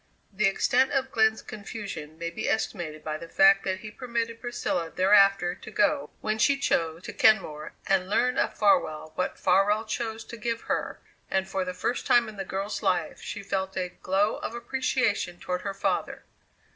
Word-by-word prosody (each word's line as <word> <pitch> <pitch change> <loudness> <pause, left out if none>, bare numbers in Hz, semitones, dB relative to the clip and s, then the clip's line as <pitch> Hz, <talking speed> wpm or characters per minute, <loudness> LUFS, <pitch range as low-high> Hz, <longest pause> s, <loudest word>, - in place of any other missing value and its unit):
The 200 +1 +2
extent 255 +7 +2
of 265 -1 0
Glenn's 220 -1 +2
confusion 200 -8 -7
may 170 0 -4
be - - -3
estimated 170 -8 -2
by 155 0 -3
the 165 0 -9
fact 195 +2 +5
that 190 -1 -2
he 215 - -8
permitted 230 -1 -3
Priscilla 180 -8 -2
thereafter 195 -1 +4
to 185 - -11
go, 250 +7 +1
when 215 0 -1
she 280 +3 +4
chose, 165 -9 0
to - - -7
Kenmore 155 -8 +2
and 190 -1 +1
learn 250 +5 +2
of - - 0
Farwell 175 -6 +2
what 185 - -2
Farwell 200 +4 +3
chose 225 0 -3
to 235 - -9
give 230 +1 -2
her, - - -2 0.3
and, 190 0 0
for 190 0 -1
the 185 0 -5
first 240 +7 -2
time 240 -1 +5
in 215 - -9
the 195 - -3
girl's 195 +2 -3
life, 190 -4 0
she 200 - -6
felt 190 -1 -2
a 180 -1 -1
glow 200 +3 +1
of 235 - -5
appreciation 235 -7 -1
toward 180 0 -3
her 200 0 -4
father. - - -2
200 Hz, 185 wpm, -27 LUFS, 185-225 Hz, 0.3 s, fact